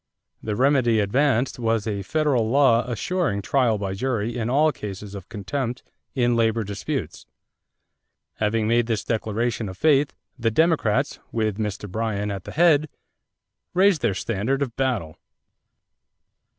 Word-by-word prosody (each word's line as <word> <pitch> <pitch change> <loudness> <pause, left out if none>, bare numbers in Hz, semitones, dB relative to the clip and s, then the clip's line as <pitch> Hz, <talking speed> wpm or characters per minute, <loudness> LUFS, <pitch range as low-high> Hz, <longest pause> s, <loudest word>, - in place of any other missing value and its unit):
The 105 -1 -3
remedy 125 -2 +3
advanced 125 +4 +1
was 115 -2 0
a 105 -3 -2
federal 135 -1 +1
law 130 -3 +4
assuring 120 - -1
trial 130 -6 +2
by 100 -2 -3
jury 115 +1 -2
in 115 -1 -2
all 150 +4 +4
cases 100 -4 -7
of 100 -1 -9
contempt 120 +4 -4 0.3
in 120 -2 +2
labor 115 -1 +2
disputes. 100 0 -5 1.1
Having 110 +1 0
made 115 0 +2
this 115 -3 -1
declaration 110 0 -1
of 95 - -9
faith, 145 -2 +3 0.3
the 115 -1 +2
Democrats, 155 -4 +1
with 110 -2 -1
Mr. 105 -1 -3
Bryan 105 0 -2
at 95 -2 -6
the - - -7
head, 155 -2 +4 0.9
raised 185 -4 +4
their 110 -5 +1
standard 115 +7 -1
of 120 -4 -6
battle. 120 -13 -1
115 Hz, 135 wpm, -24 LUFS, 105-135 Hz, 1.1 s, law